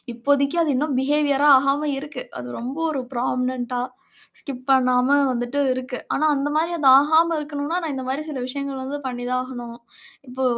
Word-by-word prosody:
இப்போதைக்கு 280 +5 +1
அது 295 -3 +1
இன்னும் 280 -1 0
பிஹேவியரா 290 0 +2
ஆகாம 280 +2 0
இருக்கு. 290 -3 -7 0.2
அது 125 - -7
ரொம்ப 255 +6 -5
ஒரு 270 -3 -2
ஃப்ராமனன்ட்டா 250 0 -2 0.6
ஸ்கிப் 255 -3 -7
பண்ணாம 255 -1 +3 0.2
வந்துட்டு 245 +3 -2
இருக்கு. 255 0 -4 0.2
ஆனா 310 - +1
அந்தமாரி 295 +4 0
அது 285 -4 +1
ஆகாம 320 +3 +3
இருக்கணுன்னா, 295 +2 -4
நான் 315 -4 -3
இந்தமாரி 265 +2 -3
சில 275 -4 -4
விஷயங்கள் 275 +1 -4
வந்து 270 +2 -4
பண்ணி 245 -1 -5
தான் 255 0 +1
ஆகணும். 240 -2 -8 0.5
இப்போ 260 +1 -4
270 Hz, 160 wpm, -22 LUFS, 255-290 Hz, 0.6 s, பண்ணாம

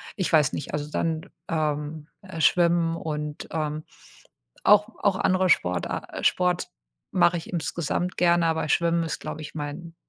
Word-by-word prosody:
ich 185 - -1
weiß 150 -4 +4
nicht, 145 - -5
also 150 0 -3
dann, 160 0 -2 0.2
ähm, 150 -1 -2
äh, 185 -4 -8
schwimmen 170 -1 +3
und, 150 -2 -4
ähm, 155 -1 -2 0.8
auch 210 +1 +6
auch 200 -2 +3
andere 185 0 +2
Sportar 90 - 0
Sport 180 -1 +2 0.4
mache 175 - +4
ich - - -9
insgesamt 170 +1 -2
gerne, 170 -1 +4
aber 160 -1 0
schwimmen 170 +1 +2
ist, 160 - -3
glaube 155 - -6
ich, 145 - -9
mein 155 +3 -6
165 Hz, 150 wpm, -25 LUFS, 150-175 Hz, 0.8 s, auch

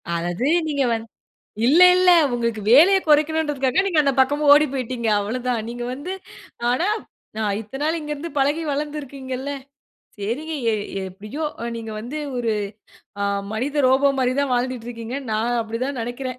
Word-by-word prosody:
அதாவது 175 +9 -2 0.2
நீங்க 285 -3 0
வந் 225 0 -3 0.6
இல்ல, 315 +7 +5 0.2
இல்ல. 365 0 +4 0.2
உங்களுக்கு 235 -3 -1
வேலைய 365 +8 +7
குறைக்கணும்ன்றதுக்காக, 300 0 +2
நீங்க 340 -6 +2
அந்த 275 - +3
பக்கமா 290 +3 +2
ஓடி 300 +1 +6
போய்ட்டிங்க. 250 -3 -3
அவ்வளதான். 240 +2 -2
நீங்க 240 0 -5
வந்து 290 +8 -6 0.6
ஆனா 335 +10 +1 0.5
நான் 210 -2 0
இத்தனை 270 +6 -8
நாள் 320 +2 +1
இங்கே 300 -1 -4
இருந்து 300 +3 -6
பழகி, 290 +4 +2
வளர்ந்து 295 +1 -3
இருக்கீங்கள்ல. 265 0 -6 0.7
சரிங்க. 245 +11 -3 0.2
எ - - +1 0.4
எப்படியோ! 210 - -7 0.2
அ - - -3
நீங்க 225 -1 -6
வந்து 245 +7 -6 0.2
ஒரு 235 -2 0 0.7
அ - - +1 0.3
மனித 280 +6 -1
ரோபோ 275 +2 +4
மாரி 255 0 +1
தான் 280 -2 0
வாழ்ந்துட்ருக்கீங்க. 245 -1 -3 0.2
நான் 235 +3 0
அப்படி 225 +1 -5
தான் 275 -3 -4
நினைக்கிறேன். 250 +2 -5
260 Hz, 155 wpm, -22 LUFS, 235-295 Hz, 0.7 s, வேலைய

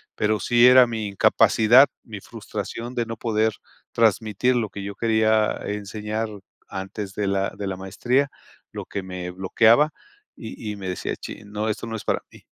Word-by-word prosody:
Pero 105 0 +1
sí 120 0 +5
era 125 0 +8
mi 110 -3 -4
incapacidad, 110 +6 +5 0.2
mi 105 -3 -8
frustración 115 +2 -6
de 120 -2 -1
no 115 -1 -5
poder 110 -1 0 0.4
transmitir 115 +2 +2
lo 110 -3 -1
que 100 +1 -7
yo 100 0 -5
quería 110 -1 +2
enseñar 105 +2 -3 0.4
antes 95 +1 -6
de 105 -1 -1
la 100 0 0
de 100 - -4
la 95 - -3
maestría, 125 +9 0 0.4
lo - - -6
que 100 - -5
me 90 -1 -6
bloqueaba 110 +10 +4 0.5
y 110 -1 -7
y - - -5
me 95 -2 -6
decía: 90 - -3
"Chin, 105 - -10
no, 105 +1 -2
esto 110 +1 -3
no 115 - -4
es - - -10
para - - 0
mí". - - -16
110 Hz, 175 wpm, -23 LUFS, 100-115 Hz, 0.5 s, era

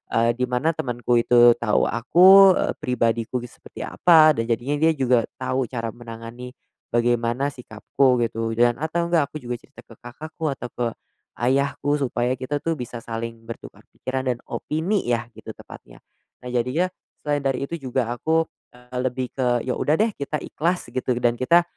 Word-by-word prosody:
eee, 115 +1 +3
di 125 +2 -2
mana 125 +6 +1
temanku 120 -5 0
itu 120 0 +6
tau 105 -3 +2
aku, 185 - +6
eee, - - 0
pribadiku 115 -1 -1
gi 120 - -10
seperti - - -10
apa, 160 -3 +5
dan 115 -5 -2
jadinya 120 +5 -1
dia - - +5
juga 125 -4 +2
tau 130 -1 -2
cara 115 -3 -4
menangani 120 +2 -10 0.4
bagaimana 120 +2 +1
sikapku, 125 0 0
gitu. 115 -1 -1
Dan 120 +1 +3
atau 160 +4 -2
nggak 165 -4 +1
aku 155 - -6
juga 120 -3 -4
cerita 135 +4 -16
ke 115 - -15
kakakku 155 +6 -6
atau 130 -2 -6
ke 120 -1 0 0.5
ayahku 140 +3 +1
supaya 125 -3 -1
kita 130 +3 -3
tuh 165 +2 -2
bisa 120 -3 -7
saling 115 0 -6
bertukar 115 - -10
pikiran 130 0 -3
dan 125 -1 -2
opini 175 +7 -2
ya, 120 -1 +1
gitu - - -10
tepatnya. - - -14 0.4
Nah 125 - -6
jadinya 125 +10 0 0.3
selain 145 -1 0
dari 135 -1 -1
itu 170 +4 -6
juga 130 -3 -2
aku, 160 +6 +1 0.3
eee, 125 +1 -10
lebih 125 0 -4
ke, 125 -3 0
ya 130 - -2
udah 150 - +2
deh, 220 +5 +2
kita 145 0 -3
ikhlas 175 +3 -2
gitu, 130 -1 -1
dan 120 0 +2
kita 170 +7 +4
125 Hz, 175 wpm, -23 LUFS, 120-145 Hz, 0.5 s, itu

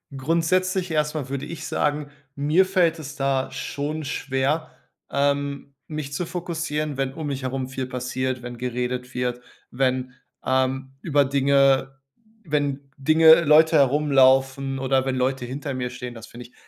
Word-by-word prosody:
Grundsätzlich 175 +5 0
erst 150 -1 0
mal 140 -4 -4
würde 140 +1 -3
ich 170 - -7
sagen: 145 0 -1 0.2
„Mir 150 +7 +3
fällt 175 -4 +2
es 145 -2 -8
da 135 -2 0
schon 145 +3 -4
schwer, 140 +3 -1 0.4
ähm, 140 0 -1
mich 150 -2 -5
zu 175 +5 -2
fokussieren, 160 -4 -3
wenn 135 -1 -1
um 155 +1 -5
mich 135 -2 -4
herum 130 0 -2
viel 130 -1 -4
passiert, 130 0 -3
wenn 120 0 -7
geredet 125 +1 -3
wird, 125 -1 -2 0.3
wenn, 130 0 0 0.3
ähm, 130 0 0
über 145 -3 +2
Dinge 135 0 +2 0.5
wenn 145 -3 -2
Dinge 160 +3 +6
Leute 155 +2 +6
herumlaufen 135 -1 +3
oder 135 0 +1
wenn 135 -1 -1
Leute 130 0 -1
hinter 140 +3 -5
mir 125 -1 -3
stehen.“ 125 -1 -7
Das 115 -1 -11
finde 120 +1 -11
ich - - -31
135 Hz, 150 wpm, -24 LUFS, 130-150 Hz, 0.5 s, Dinge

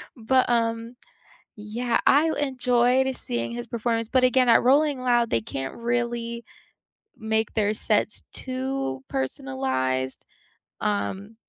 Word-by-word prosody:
But, 255 +2 +2
um 230 0 0 0.6
yeah, 230 +3 -1
I 315 +3 +5
enjoyed 255 -1 +2
seeing 115 -1 -3
his 120 0 -6
performance, 230 -1 -1
but 255 -1 +3
again, 255 0 +4
at 230 - +6
Rolling 280 +1 +3
Loud, 240 -2 +2
they 115 - +1
can't 135 +4 -5
really 235 0 -2 0.7
make 220 0 -1
their 210 -1 +1
sets 210 0 0
too 255 - -4
personalized, 130 0 -2 0.6
um 190 - -2
230 Hz, 115 wpm, -25 LUFS, -, 0.7 s, at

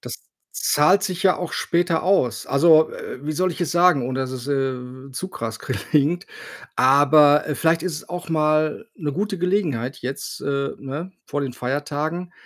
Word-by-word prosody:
das - - -7 0.4
zahlt 185 +7 +3
sich 185 -2 -3
ja 190 -2 +4
auch 180 -2 -5
später 170 -1 0
aus. 180 -11 +1
Also, 155 +2 +5
äh, 130 - -8
wie 155 - -2
soll 185 +4 0
ich 175 - -8
es 175 - -1
sagen, 170 -7 +4
ohne 130 +1 -2
dass 130 -1 -3
es, 130 0 -6
äh, 130 -1 -3
zu 185 +8 -5
krass 115 - -6
klingt? 150 +6 0 0.5
Aber, 145 +2 +5
äh, 150 - -2
vielleicht 165 +3 +1
ist 185 -3 -2
es - - -10
auch 175 -1 -6
mal 155 +5 +1
'ne 150 -6 -4
gute 200 +4 -2
Gelegenheit 165 - -1
jetzt, 130 +2 -5
äh, 140 0 -1
ne, 150 +7 -6
vor 145 - -3
den 135 -3 -3
Feiertagen 150 +7 -3
150 Hz, 180 wpm, -22 LUFS, 135-175 Hz, 0.5 s, Also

